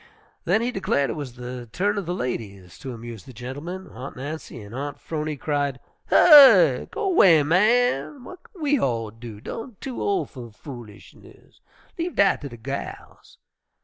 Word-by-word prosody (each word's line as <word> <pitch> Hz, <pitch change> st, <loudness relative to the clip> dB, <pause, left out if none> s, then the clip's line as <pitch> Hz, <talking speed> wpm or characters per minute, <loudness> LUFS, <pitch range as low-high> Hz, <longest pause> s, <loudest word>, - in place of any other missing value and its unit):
Then 220 Hz, -, +2 dB
he 245 Hz, -, -1 dB
declared 140 Hz, -, 0 dB
it -, -, -5 dB
was 145 Hz, -5 st, -6 dB
the 125 Hz, -1 st, -7 dB
turn 205 Hz, +3 st, 0 dB
of 190 Hz, -, -7 dB
the 175 Hz, -, -1 dB
ladies 100 Hz, -, -6 dB
to 135 Hz, -, -7 dB
amuse 115 Hz, -4 st, -9 dB
the 130 Hz, -, -12 dB
gentlemen. 145 Hz, +11 st, -7 dB
Aunt 130 Hz, 0 st, -9 dB
Nancy 145 Hz, 0 st, -7 dB
and 105 Hz, 0 st, -11 dB
Aunt 145 Hz, +2 st, -5 dB
'Phrony 155 Hz, -2 st, -4 dB
cried, 145 Hz, -1 st, -2 dB, 0.3 s
"Hysh! 295 Hz, -5 st, +7 dB
Go 400 Hz, -, -2 dB
'way, 170 Hz, -, +6 dB
man! 215 Hz, -, +2 dB
W'at 365 Hz, +8 st, -11 dB
ken 350 Hz, -6 st, -10 dB
we 290 Hz, -1 st, +2 dB
all 115 Hz, -, -1 dB
do? 115 Hz, -1 st, -10 dB
Done 225 Hz, -, -8 dB
too 260 Hz, -3 st, -6 dB
ol' 400 Hz, -2 st, 0 dB
fer 120 Hz, -3 st, -10 dB
foolishness; 115 Hz, -2 st, -14 dB, 0.4 s
leave 340 Hz, +1 st, -3 dB
dat 200 Hz, -1 st, +3 dB
ter 145 Hz, -, -5 dB
de 120 Hz, -3 st, -11 dB
gals!" 135 Hz, +5 st, -8 dB
145 Hz, 170 wpm, -24 LUFS, -, 0.4 s, Hysh